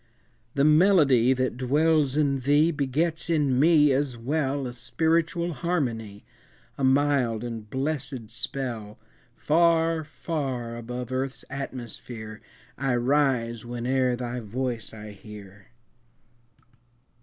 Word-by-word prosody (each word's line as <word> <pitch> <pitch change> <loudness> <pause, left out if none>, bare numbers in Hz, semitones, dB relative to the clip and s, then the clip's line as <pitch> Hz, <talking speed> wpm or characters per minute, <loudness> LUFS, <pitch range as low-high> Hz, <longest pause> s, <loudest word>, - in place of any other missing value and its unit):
The 140 - +2
melody 150 - +5
that 130 -2 0
dwells 145 +2 +2
in 140 -3 +2
thee 145 +5 +3
Begets 155 +4 -1
in 145 -6 +2
me 150 -1 +5
as 135 -2 0
well 140 +2 -1
A 125 - -5
spiritual 165 +5 0
harmony, 115 - -3 0.5
A 135 - -5
mild 130 -4 +2
and 115 -3 -6
blessèd 135 -3 -3
spell; 115 -3 -4 0.4
Far, 165 0 +2
far 135 -7 -4
above 125 +1 -6
earth's 130 +1 -3
atmosphere 120 -4 -7 0.4
I 135 -2 +1
rise, 120 -3 +1
whene'er 125 +1 0
thy 125 0 -4
voice 120 +1 -4
I 105 -1 -9
hear. 100 -1 -13
130 Hz, 110 wpm, -26 LUFS, 120-150 Hz, 0.5 s, melody